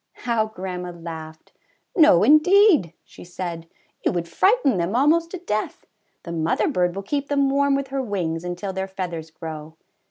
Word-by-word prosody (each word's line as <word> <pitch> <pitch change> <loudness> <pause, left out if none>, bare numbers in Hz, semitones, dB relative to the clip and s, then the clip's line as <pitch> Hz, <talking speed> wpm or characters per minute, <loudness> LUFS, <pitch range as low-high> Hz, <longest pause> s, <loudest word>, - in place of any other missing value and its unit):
^' - - -17
How 230 -3 +1
grandma 180 -3 -6
laughed! 160 -2 -9 0.4
^^No 300 - +6
indeed,'^ 310 - +5
she - - -14
said, 175 -2 -6 0.4
^^ou - - +2
would 170 -1 -3
frighten 300 - +2
them 175 +5 -1
almost 320 +6 +3
to 370 - -6
death! 215 -12 -4 0.4
The 170 - -7
mother 165 -1 0
bird 180 -1 0
will 195 - -5
keep 280 +7 -2
them 280 -1 +1
warm 280 0 +2
with 275 -1 -3
her 270 0 -2
wings 175 -8 -3
until 180 +2 -4
their 190 0 -3
feathers 175 -4 -5
grow." 160 -1 -9
190 Hz, 170 wpm, -23 LUFS, 170-275 Hz, 0.4 s, ^^No